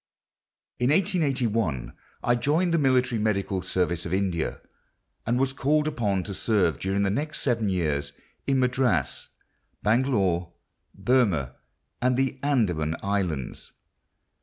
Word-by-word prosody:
In 125 - +2
1881 130 - +1 0.3
I 120 - +3
joined 155 +8 +1
the 165 - +3
military 125 -4 +2
medical 100 -3 0
service 90 -1 -1
of 85 - -1
India, 95 -4 -1 0.7
and 120 +1 +2
was 135 0 +1
called 150 +2 +1
upon 105 -10 0
to 100 - -6
serve 95 -6 +1
during 95 +1 0
the 100 - +1
next 150 +8 -2
seven 115 -6 +1
years 75 -6 -1 0.4
in 135 -1 +2
Madras, 125 - 0 0.5
Bangalore, 100 -8 +1 0.4
Burma, 100 - +1 0.5
and 125 0 +2
the 135 0 0
Andaman 90 - +1
Islands. 95 -9 -2
110 Hz, 120 wpm, -26 LUFS, 90-130 Hz, 0.7 s, I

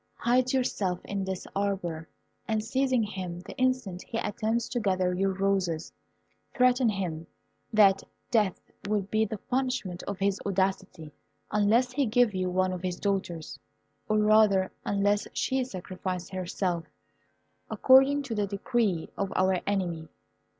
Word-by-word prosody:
Hide 250 +1 +2
yourself 205 -9 0
in 200 -1 -3
this 190 -1 -4
arbour, 185 -5 -2 0.4
and 220 -1 0
seizing 260 +1 +1
him 185 -4 -5
the 185 - -10
instant 255 -8 0
he 230 - -5
attempts 225 +2 -1
to 245 - -1
gather 185 -4 +1
your 195 +2 +1
roses, 190 -4 -1 0.6
threaten 250 -1 +4
him 170 -6 -3 0.4
that 200 -3 +5 0.3
death 210 -6 +2 0.3
will 210 -2 +1
be 215 +3 +1
the 215 +1 -5
punishment 250 -7 -2
of 200 - -3
his 195 0 0
audacity, 190 -5 -1 0.4
unless 220 +4 +3
he 270 0 +1
give 235 -1 +3
you 185 -1 -1
one 185 +1 +1
of 180 - -5
his 180 -1 -3
daughters; 185 -5 -2 0.5
or, 215 - +3
rather, 210 -3 +4
unless 205 0 +1
she 265 0 0
sacrifice 185 -4 -5
herself, 180 -2 -2 0.8
according 270 +2 +5
to 260 -4 -4
the 205 -2 0
decree 200 -3 0
of 195 -1 -1
our 185 0 +3
enemy. 175 -5 -1
200 Hz, 140 wpm, -28 LUFS, 185-225 Hz, 0.8 s, that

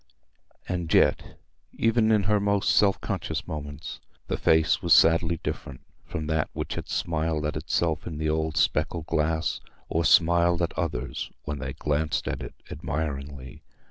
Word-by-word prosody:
And 85 -3 -3
yet, - - +2 0.4
even 115 -1 +2
in 105 -2 +3
her 105 +1 +2
most 100 0 +2
self 100 -2 +4
conscious - - -3
moments, 70 -2 -6 0.3
the - - 0
face 80 0 +3
was - - +6
sadly 85 0 +4
different 65 -3 -5 0.3
from 80 - -4
that 80 0 0
which - - -4
had - - -6
smiled 80 -2 -1
at 75 - -2
itself 80 -3 -1
in 80 -3 -5
the 80 0 -1
old 80 0 -1
specked 85 -3 +1
glass, 80 +1 0 0.3
or 85 - +1
smiled 85 +2 +4
at 85 - -1
others 80 0 -3
when 75 -1 -4
they - - -4
glanced 75 +1 -1
at - - -3
it - - -8 0.2
admiringly. 70 -4 -5
80 Hz, 155 wpm, -26 LUFS, 75-85 Hz, 0.4 s, was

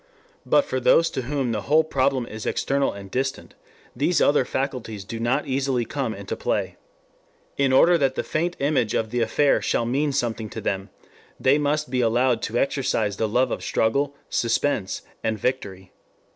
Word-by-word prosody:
But 285 - +4
for 130 - -2
those 165 +6 +4
to - - -2
whom 135 -1 -2
the 105 -2 -2
whole 155 +10 +3
problem 135 -4 0
is 110 -1 -7
external 140 0 0
and 100 -1 -10
distant, 130 +1 -3 0.4
these 155 +7 +1
other 145 -3 +3
faculties 125 -7 -3
do 115 +2 -6
not 120 +5 0
easily 135 -3 0
come 130 -5 -3
into 100 0 -5
play. - - -2 0.8
In 140 -1 +2
order 170 +6 +5
that 135 -2 +1
the - - -1
faint 175 +3 -1
image 140 -6 +1
of 110 -1 -1
the 125 - -1
affair 140 +5 +2
shall 115 - 0
mean 140 +5 0
something 115 -4 -2
to - - -6
them, 95 +1 -2 0.5
they 140 +3 +3
must 150 -1 -1
be 125 -1 +1
allowed 120 +1 +2
to 115 - -2
exercise 115 -7 0
the 110 - 0
love 125 +4 +2
of - - -3
struggle, 140 +6 0
suspense, 115 -3 0 0.2
and 110 -1 0
victory. 95 -6 -3
130 Hz, 175 wpm, -24 LUFS, 115-140 Hz, 0.8 s, order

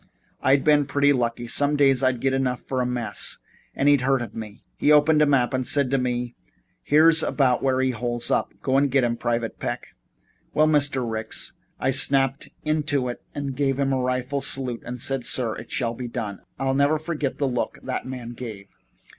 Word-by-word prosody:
I'd 135 +1 +3
been 145 -2 +4
pretty 145 +1 +3
lucky 120 -2 -1
some 145 +5 +1
days 135 -3 +3
I 130 -1 +4
got 130 +2 -1
enough 130 -2 -1
for 130 -1 -2
a 125 - 0
mess 120 -5 -2 0.4
and 140 - +1
he'd 145 -2 +5
heard 135 -1 +1
of 115 - -8
me. 110 -2 -9
He 150 - +2
opened 150 +1 +5
a 150 - +5
map 135 -2 +2
and 130 -1 -1
said 140 -3 +2
to 135 - +2
me: 125 -1 -2 0.5
'Here's 160 +2 +5
about 130 -6 +1
where 130 -1 +1
he 130 0 +1
holes 120 0 -1
up. - - +1
Go 135 0 +2
get 135 -1 +2
him, 120 -1 +1
Private 115 -1 -2
Peck.' - - -4 0.7
Well, 155 - +5
Mr. 145 -5 +2
Ricks, 110 -1 -4 0.3
I 130 - +1
snapped 135 0 +2 0.2
into 145 -4 0
it 120 - -6
and 140 -2 -4
gave 135 -1 0
him 135 -1 +1
a 130 - 0
rifle 130 +2 -1
salute, 130 -4 -1
and 125 +1 -6
said, 135 +1 0
'Sir, 120 -3 +1
it - - -10
shall 115 -3 -1
be 125 +1 -6
done' 105 -4 -5
and - - -31
I'll 135 0 0
never 140 +3 +3
forget 155 -3 -3
the 140 - 0
look 125 -2 -2
that 130 0 -4
man 125 -2 -6
gave 110 -5 -8
me. - - -38
130 Hz, 205 wpm, -24 LUFS, 120-140 Hz, 0.7 s, he'd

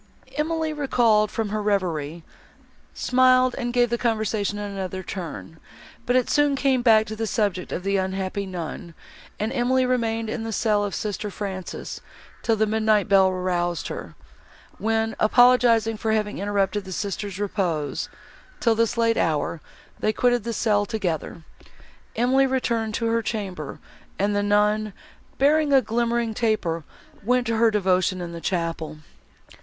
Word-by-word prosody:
Emily, 315 +1 -1
recalled 235 -7 +2
from 225 -2 -2
her 215 +1 -2
reverie, 170 -6 -1 0.7
smiled, 255 0 +3
and 240 -2 -2
gave 240 -1 +2
the 235 - 0
conversation 215 -3 0
another 195 -2 -4
turn, 165 -3 -7 0.5
but 245 - +2
it 255 -1 +3
soon 290 -1 +3
came 270 -2 +2
back 220 -3 +5
to 220 - -6
the 225 0 -2
subject 200 -4 -1
of 180 - -3
the 195 0 +1
unhappy 190 +1 -2
nun, 170 -1 -6 0.4
and 220 +4 -1
Emily 255 0 +2
remained 230 -3 0
in 220 +1 -3
the 225 - -4
cell 210 -1 +1
of 205 - -3
sister 210 0 -3
Frances, 190 -2 -6 0.4
till 225 - +2
the 220 0 +2
midnight 215 -1 +2
bell 195 -2 +5
aroused 180 -2 -1
her; - - -7 0.6
when, 225 0 0
apologising 230 -1 +4
for 220 0 0
having 210 -1 -1
interrupted 200 0 0
the 190 - -9
sister's 200 0 -4
repose, 175 -9 -2 0.5
till 230 - +3
this 230 +1 0
late 230 -1 +2
hour, 155 0 0 0.4
they 215 - +1
quitted 245 +1 +1
the 235 - -3
cell 210 -2 +2
together. 180 -7 -3 0.7
Emily 260 +3 +3
returned 230 -4 -1
to 230 - -1
her 230 0 +1
chamber, 190 -10 -4 0.4
and 205 +1 +1
the 205 - +2
nun, 210 +1 +2 0.4
bearing 295 +2 +3
a 275 - +7
glimmering 235 0 0
taper, 215 -8 0 0.4
went 250 +3 +2
to 230 -1 0
her 230 0 +5
devotion 185 -3 +1
in 175 -1 -5
the 170 0 -7
chapel. 165 -4 -2
215 Hz, 150 wpm, -24 LUFS, 190-235 Hz, 0.7 s, a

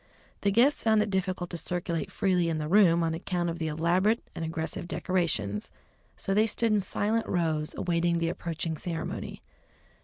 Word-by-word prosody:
The 200 - +2
guests 240 +8 +4
found 220 -1 +4
it 210 - -4
difficult 185 -2 -1
to 170 - -3
circulate 170 -1 -2
freely 180 -3 +1
in 160 - -1
the 150 -1 -3
room 170 -2 +5
on 165 -1 0
account 175 0 -2
of 170 - -6
the 160 - -1
elaborate 175 +8 +1
and - - -5
aggressive 160 +1 -3
decorations, 165 - -1 0.5
so 195 - -1
they 215 +2 +4
stood 225 +1 +1
in 210 - +4
silent 210 +4 -1
rows 160 -4 0
awaiting 170 0 +1
the 165 0 0
approaching 165 -2 -3
ceremony. 165 0 -5
175 Hz, 175 wpm, -28 LUFS, 165-195 Hz, 0.5 s, room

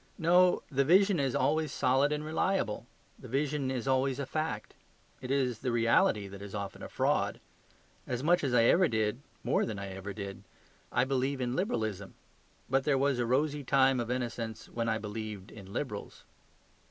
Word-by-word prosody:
No; 180 +2 +4
the 140 0 +2
vision 190 +4 +4
is 135 -3 0
always 155 +1 +1
solid 135 +3 +2
and 150 0 -2
reliable. 155 - -1 0.3
The 130 - -10
vision 140 +2 -1
is 130 -1 -3
always 130 0 +2
a 140 - -3
fact. 155 +4 -3 0.5
It 125 - -6
is 130 -4 +1
the 130 -2 -1
reality 115 -3 +3
that 100 0 -10
is 100 0 -7
often 100 -1 -5
a - - -7
fraud. - - 0 0.7
As 125 +1 -3
much 175 +2 +3
as 135 - 0
I 120 -1 +5
ever 175 +9 +5
did, 110 +1 -1 0.2
more - - +2
than 110 -3 -3
I 100 0 -5
ever 95 +1 -6
did, 100 -1 -7 0.5
I - - +3
believe 135 +1 0
in 125 0 -1
Liberalism. 110 - -2 0.5
But 135 +1 +2
there 140 -1 +2
was 135 -1 +1
a 120 - 0
rosy 145 +3 +1
time 135 -1 +3
of 120 -1 -3
innocence 120 -3 -3
when 115 -1 -2
I 110 - +1
believed 105 -2 -6
in 100 -3 -11
Liberals. 105 -3 -5
130 Hz, 180 wpm, -31 LUFS, 110-140 Hz, 0.7 s, I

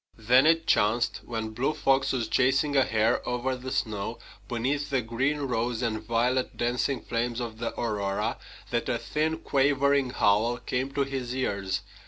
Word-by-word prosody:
Then 125 +6 +4
it 165 0 +3
chanced, 115 +3 +2
when 110 -2 -4
Blue 130 +7 -1
Fox 135 0 +2
was 120 -4 -1
chasing 135 +4 +2
a 135 - +6
hare 110 -2 +1
over 125 +2 -1
the 130 +1 -7
snow, 105 -5 -2 0.3
beneath 135 +5 -1
the 135 -3 0
green, 135 +6 -1
rose, 120 -2 -1
and 110 -2 -1
violet 120 +3 0
dancing 120 +2 0
flames 120 0 -2
of 115 -2 -5
the 115 - -4
aurora, 100 -4 -1 0.3
that - - -1
a - - +1
thin, 160 +1 -1
quavering 140 -2 +2
howl 110 +1 +2
came 130 +2 -3
to 140 - +1
his 130 -2 -4
ears. 100 -7 -1
125 Hz, 165 wpm, -27 LUFS, 115-135 Hz, 0.3 s, a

